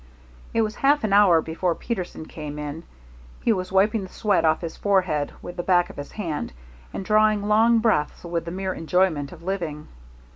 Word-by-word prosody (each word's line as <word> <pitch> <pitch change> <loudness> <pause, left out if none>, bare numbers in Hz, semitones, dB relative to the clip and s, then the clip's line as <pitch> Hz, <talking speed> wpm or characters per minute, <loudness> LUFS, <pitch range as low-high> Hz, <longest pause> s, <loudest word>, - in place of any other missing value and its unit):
It 225 - +2
was 215 -1 -4
half 285 0 +3
an 210 -2 0
hour 185 -6 +6
before 170 +2 -1
Peterson 185 -8 -5
came 150 -2 -7
in. 150 +2 -5 0.6
He 230 - +4
was 185 -2 -4
wiping 205 +3 +3
the 190 - -8
sweat 205 0 +1
off 155 0 +2
his 165 -2 -5
forehead 185 -8 +1
with 175 - -8
the - - -1
back 175 -1 +2
of - - -17
his 145 0 -7
hand, 165 - -4 0.4
and 195 - -5
drawing 215 0 +3
long 225 +2 +4
breaths 220 -10 +1
with 170 -1 -3
the - - -4
mere 190 +1 -3
enjoyment 165 -4 0
of 170 -2 -12
living. 170 -5 -4
185 Hz, 190 wpm, -24 LUFS, 160-210 Hz, 0.6 s, hour